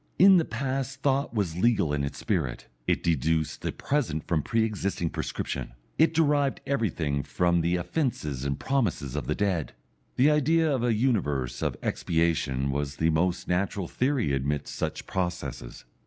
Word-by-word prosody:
In 190 0 +8
the 165 - +2
past 135 +2 -3
thought 140 0 +1
was 100 -8 -1
legal 95 -7 +2
in 70 -1 0
its 70 -1 -4
spirit, 80 - -2 0.2
it - - +1
deduced 80 0 0
the - - -2
present 120 - -1
from 80 -3 +1
pre 115 +8 +1
existing 100 -6 -1
prescription, - - -4 0.3
it 160 - +5
derived 145 -3 +2
everything 85 - 0
from 85 +4 +1
the 85 +2 +1
offences 85 - -2
and 70 0 -2
promises 95 - -1
of 75 - -3
the 75 - 0
dead; 95 -7 -1 0.4
the 140 +4 +5
idea 155 +1 +3
of 130 -3 0
a 120 -2 +2
universe 75 - 0
of - - -1
expiation 80 -5 0
was 70 0 -2
the 80 +2 +2
most 85 +3 0
natural 95 +1 0
theory 130 - 0
amidst 70 +2 -2
such - - -3
processes. 90 -10 -4
90 Hz, 160 wpm, -27 LUFS, -, 0.4 s, In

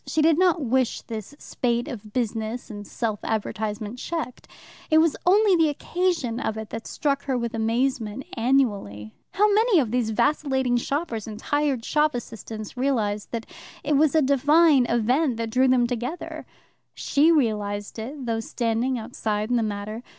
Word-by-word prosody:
She 315 - +1
did 320 0 +4
not 360 -3 +4
wish 255 0 0
this 225 +4 -7
spate 240 -2 -2
of 220 -7 -8
business 225 0 -3
and 205 -1 -8
self 220 -4 -2
advertisement 215 +1 -3
checked. 320 -6 -5 0.4
It 315 - +5
was 320 -1 +4
only 400 +1 +5
the 325 -2 +4
occasion 310 -6 -1
of 220 -4 -2
it 220 -1 -7
that 225 0 -6
struck 280 -1 -1
her 265 -2 0
with 235 -1 -3
amazement 230 +1 -1
annually. 210 - 0 0.2
How 415 +2 +4
many 440 -1 +4
of 240 -7 0
these 245 -2 0
vacillating 265 +1 +1
shoppers 240 -4 -2
and 215 -1 -7
tired 285 -1 -1
shop 300 -2 +2
assistants 220 -2 -7
realized 225 -6 -1
that 230 -1 -4 0.4
it 295 0 +1
was 305 +2 +3
a 315 - +5
divine 285 0 +4
event 245 +3 +1
that 230 -1 -3
drew 255 +3 +3
them 255 -1 +4
together? 245 +7 -5 0.5
She 300 +4 +3
realized 210 -8 0
it, 260 +4 -6
though 225 -1 -1
standing 235 +2 -1
outside 215 -1 -3
in - - +3
the 235 - +2
matter. 215 +1 -4
245 Hz, 165 wpm, -24 LUFS, 220-290 Hz, 0.5 s, It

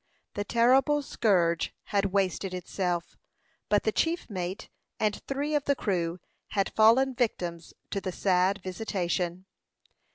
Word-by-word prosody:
The 205 - -2
terrible 265 +7 +3
scourge 175 -10 +1
had 200 -1 0
wasted 195 -1 0
itself; 180 -1 -3 0.5
but 205 0 +3
the 220 - +1
chief 335 +9 0
mate 185 0 -4 0.3
and 210 -1 0
three 285 +2 -2
of 295 -2 +1
the 280 - +2
crew 175 -6 -1 0.3
had 195 -2 -1
fallen 240 +5 +5
victims 175 -9 -2 0.2
to 200 - -2
the 185 - -3
sad 185 +1 +1
visitation. 185 -2 -2
200 Hz, 130 wpm, -28 LUFS, 180-235 Hz, 0.5 s, fallen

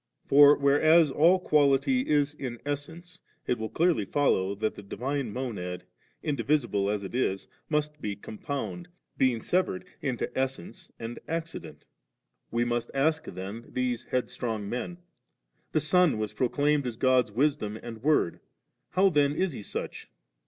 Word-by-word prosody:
For 145 +1 +7
whereas 150 +2 +5
all 170 +7 +5
quality 150 - +2
is 145 -1 +2
in 125 -5 -6
essence, 160 +5 -5 0.3
it 125 - 0
will 110 0 -3
clearly 170 - +2
follow 100 -5 +1
that 110 +2 -1
the - - -10
Divine 130 +4 -3
Monad, 95 -8 -4 0.4
indi 145 -6 -1
visible 120 -8 +1
as 105 -1 -1
it 95 - -7
is, 95 -6 -1 0.2
must 150 -1 -1
be 105 -1 -3
compound, 140 - -5 0.3
being 130 -3 +3
severed 185 +6 0 0.2
into 130 -4 -3
essence 130 -9 -4
and 115 +1 -6
accident^ 165 0 -5 0.7
We 120 +1 0
must 120 -1 -1
ask 155 +3 +1
then 100 +5 -7
these 125 -2 -2
headstrong 120 -4 -2
men; 125 - -4 0.7
The 155 - +2
Son 175 -3 +3
was 110 -1 -3
proclaimed 145 +2 +1
as 115 -2 -5
God's 130 -3 +3
Wisdom 120 -3 0
and 115 -1 -9
Word; 150 - +2 0.5
how 190 +1 +4
then 145 -3 +2
is 190 +1 0
He - - -7
such - - -6
135 Hz, 145 wpm, -28 LUFS, 115-150 Hz, 0.7 s, For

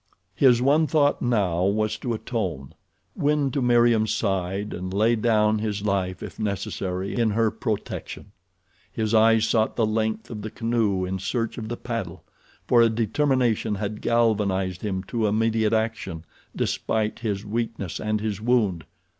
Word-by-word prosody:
His 125 +3 +4
one 150 +4 +4
thought 145 -2 +2
now 100 -8 +1
was 110 +2 +1
to 120 0 -2
atone—win 115 - -3
to 140 - -1
Meriem's 120 -3 +3
side 95 0 -1
and 90 +1 -5
lay 110 +4 +3
down 110 -1 +2
his 105 -2 -3
life, 95 -2 -1
if - - -9
necessary, 95 -2 -3
in 115 -2 +2
her 110 +1 +1
protection. 105 -3 -5 0.6
His 110 +1 -2
eyes 115 0 +5
sought 110 -1 +1
the 115 - +2
length 110 +1 -2
of 105 -2 -6
the 110 - -5
canoe 110 -4 0
in 95 +1 -3
search 115 +5 -2
of 110 -1 -6
the 120 - -4
paddle, 115 -8 -5 0.4
for 120 - +5
a 115 - +5
determination 115 -1 +1
had 105 +1 -4
galvanized 100 -6 +1
him 95 -3 -2
to 110 +2 -1
immediate 110 +1 +1
action 110 -7 -2 0.3
despite 110 -1 -1
his 105 -3 -3
weakness 110 -4 -3
and 110 0 -1
his 105 -2 -3
wound. 110 -9 +1
110 Hz, 150 wpm, -24 LUFS, 100-115 Hz, 0.6 s, eyes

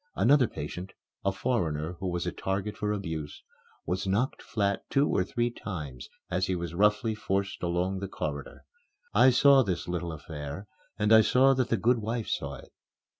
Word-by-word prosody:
Another 130 0 +5
patient, 90 +5 -6 0.3
a 100 - +2
foreigner 85 -8 -1
who 95 - -3
was 85 0 -2
a 90 - -1
target 95 +2 -3
for 105 0 -1
abuse, 80 -8 -4 0.4
was 95 +2 -2
knocked 110 +8 0
flat 100 -3 -1
two 140 +1 +3
or 95 - +2
three 120 +5 -1
times 75 - -7 0.2
as 95 +2 +1
he 95 - 0
was 85 -2 -4
roughly 105 +4 +2
forced 100 -2 -2
along 90 +2 -1
the 100 - -4
corridor. 75 -6 -5 0.5
I 130 - +7
saw 135 +2 +6
this 95 -8 -2
little 85 -1 -3
affair 75 +3 -7 0.3
and 105 +1 +3
I 110 - +9
saw 130 +5 +5
that 130 -2 0
the 115 - +2
good 120 +4 +2
wife 110 +1 -3
saw 70 -3 -2
it. - - -14
95 Hz, 175 wpm, -28 LUFS, 85-110 Hz, 0.5 s, I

